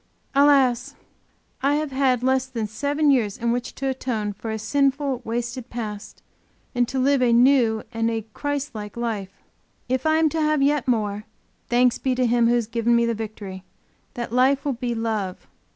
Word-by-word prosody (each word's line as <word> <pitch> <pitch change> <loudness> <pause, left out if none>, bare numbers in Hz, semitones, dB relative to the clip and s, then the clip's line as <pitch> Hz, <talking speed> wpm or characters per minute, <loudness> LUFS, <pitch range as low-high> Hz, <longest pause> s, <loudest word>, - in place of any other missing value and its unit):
Alas! 275 -4 +3 0.7
I 280 +2 +2
have 305 -1 -2
had 260 -2 +1
less 260 0 +2
than 235 -4 -3
seven 285 +7 +1
years 225 -7 +1
in 235 0 0
which 245 0 -3
to 270 - -3
atone 240 -6 -2
for 225 +3 -7
a 220 - -2
sinful, 275 +2 0
wasted 240 +2 -4
past 215 -3 -7 0.5
and 245 -2 +1
to 265 - -4
live 270 +1 +3
a 245 -1 +3
new 235 -2 +4
and 230 0 0
a 225 -2 -3
Christ 285 -1 -3
like 210 0 -7
life. 220 -5 -3 0.6
If 260 +3 0
I 315 0 +4
am 320 0 +4
to 320 +1 -2
have 305 -2 +2
yet 285 -2 +1
more, 210 -3 0 0.4
thanks 245 0 +3
be 260 -1 0
to 255 0 +1
Him 235 0 +3
who 240 - +3
has 240 -2 +1
given 230 +1 +1
me 235 0 +3
the 235 - 0
victory, 205 -4 -7 0.5
that 235 -1 -5
Life 265 +3 +3
will 285 - +1
be 240 0 -3
Love. 215 -5 -3
245 Hz, 185 wpm, -23 LUFS, 225-270 Hz, 0.7 s, new